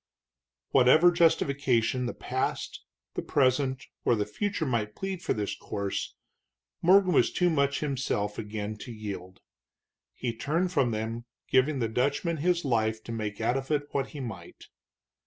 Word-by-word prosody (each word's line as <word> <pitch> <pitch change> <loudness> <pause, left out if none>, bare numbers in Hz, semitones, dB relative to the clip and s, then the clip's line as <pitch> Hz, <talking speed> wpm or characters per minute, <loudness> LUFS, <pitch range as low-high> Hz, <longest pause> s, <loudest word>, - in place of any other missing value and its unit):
Whatever 140 +7 +6
justification 140 -7 +2
the - - -4
past, 130 +1 -3 0.3
the - - -2
present, 130 -1 +1 0.2
or 120 - +3
the 105 -2 0
future 200 - -2
might 110 -5 -1
plead 195 -2 -4
for - - -1
this 105 -2 -2
course, 100 -2 -4 0.7
Morgan 185 +1 +5
was - - +4
too 180 -1 +2
much 140 -2 +1
himself 125 -8 -1
again 105 0 -4
to 120 - -8
yield. 100 -4 -7 0.7
He 120 -2 -3
turned 165 +10 0
from 140 -8 +2
them, 115 +1 -3 0.2
giving 135 +3 +3
the 115 -3 0
Dutchman 140 +8 0
his 175 +2 +1
life 110 -3 +1
to - - -7
make 105 -2 -4
out 120 +3 +1
of 135 0 -5
it 145 -1 0
what 135 -1 -1
he 150 - -9
might. 110 -10 -8
130 Hz, 155 wpm, -28 LUFS, 110-150 Hz, 0.7 s, Whatever